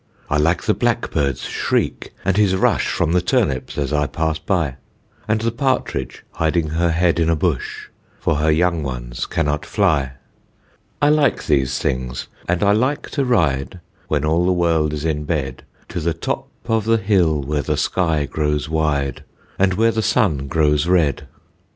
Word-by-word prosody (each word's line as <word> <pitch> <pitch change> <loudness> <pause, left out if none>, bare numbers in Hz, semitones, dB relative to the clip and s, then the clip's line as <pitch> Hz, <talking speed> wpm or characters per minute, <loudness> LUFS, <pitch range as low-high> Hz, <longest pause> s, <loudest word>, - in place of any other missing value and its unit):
I 75 - +3
like 80 +4 +2
the - - +2
blackbird's 70 -3 0
shriek, - - -1
and 95 0 +2
his 100 -2 +3
rush 95 - +2
From 80 - 0
the 90 +1 +3
turnips 90 - 0
as 70 0 -1
I 75 -1 +1
pass 80 0 -1
by, 80 -5 -1 0.5
And 110 0 +1
the 115 0 0
partridge 130 - -2
hiding 80 0 0
her 85 +2 +1
head 85 +1 +2
in 80 0 +2
a 85 - +3
bush, 80 -5 -2 0.3
For 80 - 0
her 75 +2 +1
young 85 +1 +2
ones - - -4
cannot 75 -2 -1
fly. 80 - +1 0.9
I 145 - +6
like 150 -4 +2
these 65 -3 +1
things, 65 0 -2 0.2
and 90 +3 +1
I 100 - +4
like 130 +7 0
to 140 - 0
ride 85 - +1 0.3
When 75 -1 0
all 85 +3 +2
the 95 - +3
world 85 -3 +1
is 75 0 -4
in 75 -2 -1
bed, 70 -5 -2 0.3
To 85 - -3
the 85 0 -1
top 80 - -3 0.2
of 115 -2 0
the 115 0 +3
hill 95 -7 +2
where 75 +1 -1
the - - -1
sky 80 -5 +1
grows 75 +1 -1
wide, 75 -4 -1 0.4
And 95 -1 +3
where 115 +2 +3
the 110 - -1
sun 75 -11 +1
grows 75 +2 +2
red. 85 -6 +2
80 Hz, 175 wpm, -20 LUFS, 75-95 Hz, 0.9 s, I